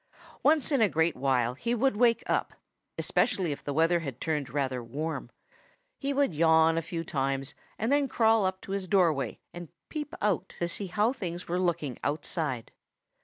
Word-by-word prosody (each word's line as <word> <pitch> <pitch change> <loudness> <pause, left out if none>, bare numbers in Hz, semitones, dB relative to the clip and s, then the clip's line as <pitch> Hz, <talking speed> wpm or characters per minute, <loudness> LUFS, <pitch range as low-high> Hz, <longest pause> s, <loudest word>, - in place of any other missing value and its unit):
Once 305 0 +3
in 275 -4 +3
a 215 - +5
great 160 0 +1
while 125 -2 +1
he 235 - -1
would 265 0 +2
wake 235 +1 +3
up, - - -1 0.4
especially 180 -5 +1
if 140 - -6
the 145 - -3
weather 165 +4 +3
had 135 -7 -6
turned 150 -4 -2
rather 130 -3 -2
warm. 150 +8 -4 0.7
He 280 0 -1
would 280 -8 +1
yawn 160 +1 +4
a 165 - +1
few 165 +1 -4
times 135 -2 -2 0.2
and 225 +5 -1
then 285 -1 +3
crawl 225 -3 +3
up 185 0 -1
to - - -9
his 195 -1 -2
doorway 160 - +2 0.2
and 175 -2 -8 0.2
peep 300 -2 -5
out 195 -2 -1
to 175 - -1
see 195 +3 -3
how 210 +6 +1
things 180 -8 -5
were 175 +1 -1
looking 170 -8 -1
outside. 145 -4 -2
170 Hz, 180 wpm, -29 LUFS, 145-210 Hz, 0.7 s, a